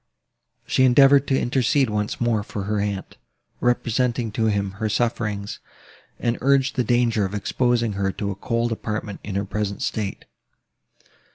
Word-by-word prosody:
She 130 Hz, -, +2 dB
endeavoured 135 Hz, +2 st, +6 dB
to 135 Hz, -, +2 dB
intercede 130 Hz, +2 st, +2 dB
once 105 Hz, 0 st, -2 dB
more 120 Hz, -3 st, +1 dB
for 105 Hz, -1 st, -5 dB
her 105 Hz, +1 st, -1 dB
aunt, 100 Hz, -1 st, -3 dB, 0.4 s
represented 120 Hz, -1 st, 0 dB
to 110 Hz, 0 st, +1 dB
him 100 Hz, -2 st, 0 dB
her 110 Hz, -, 0 dB
sufferings, 105 Hz, -2 st, -1 dB, 0.6 s
and 120 Hz, 0 st, -1 dB
urged 135 Hz, 0 st, +3 dB
the 125 Hz, -, +1 dB
danger 120 Hz, -2 st, +2 dB
of 95 Hz, +1 st, -3 dB
exposing 120 Hz, +1 st, 0 dB
her 95 Hz, 0 st, -1 dB
to 100 Hz, -1 st, -3 dB
a -, -, -5 dB
cold 115 Hz, +4 st, -1 dB
apartment 105 Hz, -2 st, -4 dB
in 100 Hz, -, -5 dB
her 100 Hz, 0 st, 0 dB
present 100 Hz, 0 st, -3 dB
state. 105 Hz, -3 st, -3 dB
110 Hz, 155 wpm, -23 LUFS, 105-120 Hz, 0.6 s, endeavoured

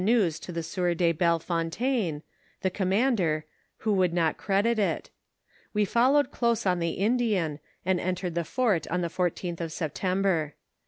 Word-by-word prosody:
news 200 Hz, -7 st, +2 dB
to -, -, -8 dB
the 165 Hz, -1 st, -3 dB
»«iour 175 Hz, 0 st, -1 dB
de 170 Hz, -1 st, +3 dB
I3elle 170 Hz, +1 st, +2 dB
Fontaine, 170 Hz, -, -1 dB, 0.4 s
the 190 Hz, -, +1 dB
commander, 190 Hz, -5 st, +1 dB, 0.3 s
who 215 Hz, -2 st, 0 dB
wonld 185 Hz, -2 st, +3 dB
not 165 Hz, -3 st, +2 dB
credit 205 Hz, +4 st, +1 dB
it; 205 Hz, -, -1 dB, 0.6 s
we 210 Hz, 0 st, +3 dB
followed 255 Hz, +7 st, +3 dB
close 235 Hz, -3 st, 0 dB
on 180 Hz, -2 st, +2 dB
the 170 Hz, 0 st, 0 dB
Indian, 200 Hz, -8 st, +1 dB, 0.3 s
and 185 Hz, -1 st, +2 dB
ei,^«^red 180 Hz, -1 st, -2 dB
tho 170 Hz, -, 0 dB
t'uit 205 Hz, -, 0 dB
on 180 Hz, +2 st, 0 dB
the 170 Hz, -, -1 dB
14th 175 Hz, 0 st, -2 dB
of 165 Hz, -1 st, -3 dB
September. 175 Hz, 0 st, -1 dB
180 Hz, 160 wpm, -27 LUFS, 170-210 Hz, 0.6 s, de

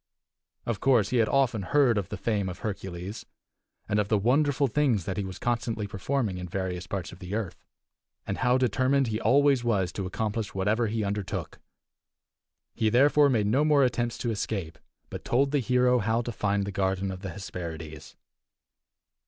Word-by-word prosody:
Of 115 Hz, -3 st, -2 dB
course 120 Hz, -7 st, +3 dB
he 125 Hz, -, +1 dB
had 115 Hz, -2 st, +3 dB
often 130 Hz, -6 st, +2 dB
heard 125 Hz, +4 st, +3 dB
of 95 Hz, -, -5 dB
the 105 Hz, -, -5 dB
fame 100 Hz, -2 st, -1 dB
of 90 Hz, -, -7 dB
Hercules, 95 Hz, 0 st, -5 dB, 0.6 s
and 105 Hz, 0 st, +1 dB
of 105 Hz, -, +1 dB
the 105 Hz, -, +2 dB
wonderful 140 Hz, +6 st, +2 dB
things 125 Hz, -, +1 dB
that 95 Hz, -, -3 dB
he 100 Hz, -, -2 dB
was 95 Hz, -1 st, -6 dB
constantly 115 Hz, -1 st, -1 dB
performing 100 Hz, 0 st, -2 dB
in 90 Hz, -1 st, -6 dB
various 90 Hz, -1 st, -3 dB
parts 95 Hz, -5 st, -4 dB
of 90 Hz, -, -12 dB
the 90 Hz, +2 st, -5 dB
earth, 110 Hz, -6 st, -4 dB, 0.6 s
and 95 Hz, -, -3 dB
how 125 Hz, 0 st, +3 dB
determined 130 Hz, +2 st, +2 dB
he 110 Hz, 0 st, -2 dB
always 135 Hz, +1 st, +4 dB
was 100 Hz, -6 st, +1 dB
to 95 Hz, 0 st, -4 dB
accomplish 105 Hz, +2 st, -3 dB
whatever 105 Hz, +5 st, +1 dB
he 110 Hz, +1 st, -1 dB
undertook. 100 Hz, -3 st, -4 dB, 1.1 s
He, 110 Hz, -, +1 dB
therefore, 140 Hz, +5 st, +5 dB
made 115 Hz, -6 st, +2 dB
no 125 Hz, +8 st, +2 dB
more 150 Hz, -2 st, +4 dB
attempts 120 Hz, -2 st, 0 dB
to 120 Hz, -, -1 dB
escape, 95 Hz, -6 st, -4 dB, 0.3 s
but -, -, -6 dB
told 135 Hz, +3 st, +1 dB
the 145 Hz, -, +2 dB
hero 125 Hz, 0 st, +3 dB
how 115 Hz, +3 st, 0 dB
to 120 Hz, -, -4 dB
find 100 Hz, -2 st, 0 dB
the 100 Hz, -, -4 dB
garden 95 Hz, 0 st, -1 dB
of 95 Hz, -, -7 dB
the 95 Hz, -, -5 dB
Hesperides. 80 Hz, -4 st, -7 dB
110 Hz, 180 wpm, -27 LUFS, 95-125 Hz, 1.1 s, therefore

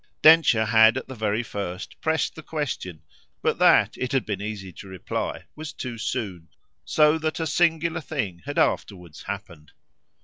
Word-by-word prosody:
Densher 155 Hz, -9 st, +7 dB
had 110 Hz, +2 st, +5 dB
at 130 Hz, -, -5 dB
the 130 Hz, -, -7 dB
very 110 Hz, -1 st, -1 dB
first 95 Hz, -4 st, -6 dB
pressed 160 Hz, 0 st, 0 dB
the 160 Hz, -, -10 dB
question, 145 Hz, -, -4 dB, 0.4 s
but -, -, +1 dB
that, -, -, +5 dB
it 125 Hz, -, -3 dB
had 135 Hz, -, +1 dB
been 100 Hz, -3 st, -3 dB
easy 100 Hz, -3 st, -5 dB
to 100 Hz, -, -11 dB
reply, 95 Hz, -1 st, -4 dB
was 155 Hz, -1 st, -7 dB
too 120 Hz, -6 st, -6 dB
soon; 100 Hz, -9 st, -4 dB, 0.4 s
so 155 Hz, +1 st, +3 dB
that 155 Hz, +1 st, -2 dB
a 165 Hz, -, -1 dB
singular 170 Hz, 0 st, +1 dB
thing 115 Hz, -, -4 dB
had 145 Hz, -, -4 dB
afterwards 90 Hz, -5 st, -1 dB
happened. 90 Hz, -7 st, -8 dB
115 Hz, 165 wpm, -25 LUFS, 100-155 Hz, 0.4 s, Densher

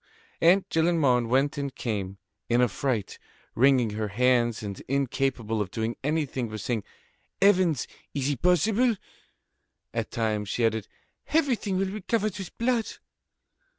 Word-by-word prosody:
Aunt 180 Hz, +4 st, +5 dB
Gillenormand 155 Hz, -8 st, +2 dB
went 140 Hz, +4 st, +2 dB
and 140 Hz, -2 st, -4 dB
came, 100 Hz, -4 st, -3 dB, 0.3 s
in 120 Hz, +1 st, +3 dB
affright, 125 Hz, -1 st, 0 dB, 0.3 s
wringing 130 Hz, -3 st, +4 dB
her 105 Hz, +1 st, -2 dB
hands 120 Hz, +1 st, +2 dB
and 100 Hz, -2 st, -6 dB
incapable 130 Hz, -4 st, 0 dB
of 100 Hz, -, -3 dB
doing 110 Hz, +3 st, -2 dB
anything 140 Hz, -5 st, -1 dB
but 110 Hz, 0 st, -6 dB
saying: 110 Hz, 0 st, -2 dB, 0.6 s
"Heavens! 185 Hz, -, +3 dB, 0.3 s
is 140 Hz, -2 st, 0 dB
it 145 Hz, -4 st, -2 dB
possible?" 215 Hz, -, +3 dB, 1.0 s
At 115 Hz, -2 st, -2 dB
times 110 Hz, -3 st, -1 dB
she 120 Hz, -, +1 dB
added: 110 Hz, -2 st, 0 dB, 0.4 s
"Everything 255 Hz, -, +1 dB
will 190 Hz, 0 st, 0 dB
be 215 Hz, +1 st, -5 dB
covered 215 Hz, 0 st, 0 dB
with 190 Hz, -, -8 dB
blood." 235 Hz, -1 st, 0 dB
130 Hz, 135 wpm, -27 LUFS, 115-180 Hz, 1.0 s, Aunt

